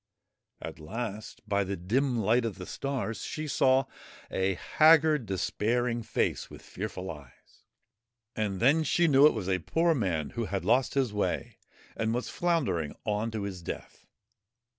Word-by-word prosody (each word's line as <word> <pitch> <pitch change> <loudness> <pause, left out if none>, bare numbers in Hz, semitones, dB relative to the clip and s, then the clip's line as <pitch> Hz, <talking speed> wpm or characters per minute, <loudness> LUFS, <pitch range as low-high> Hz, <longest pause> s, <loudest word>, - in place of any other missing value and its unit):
At - - -7
last, 110 +6 -6
by 100 0 +1
the 95 0 -4
dim 120 +8 0
light 115 +3 +2
of 110 -5 -3
the 90 - -7
stars, 135 -3 -3
she 155 0 -4
saw 135 -1 +3 0.5
a 95 0 0
haggard, 155 - +4
despairing 115 +6 0
face - - -1
with - - -12
fearful 95 -1 -5
eyes; 75 -5 -15 0.7
and 105 -3 -2
then 145 +8 +4
she 170 +3 +2
knew 140 0 +7
it - - +2
was 100 -5 -4
a 95 -1 +1
poor 165 - +2
man 90 - -1
who 120 -1 -3
had 95 -3 -3
lost 125 +6 +2
his 130 -6 +1
way 105 - -2 0.4
and 115 0 0
was 125 - -3
floundering 145 - 0
on 105 +1 0
to 110 -2 -4
his 95 -3 -5
death. 85 - -8
110 Hz, 160 wpm, -29 LUFS, 95-135 Hz, 0.7 s, knew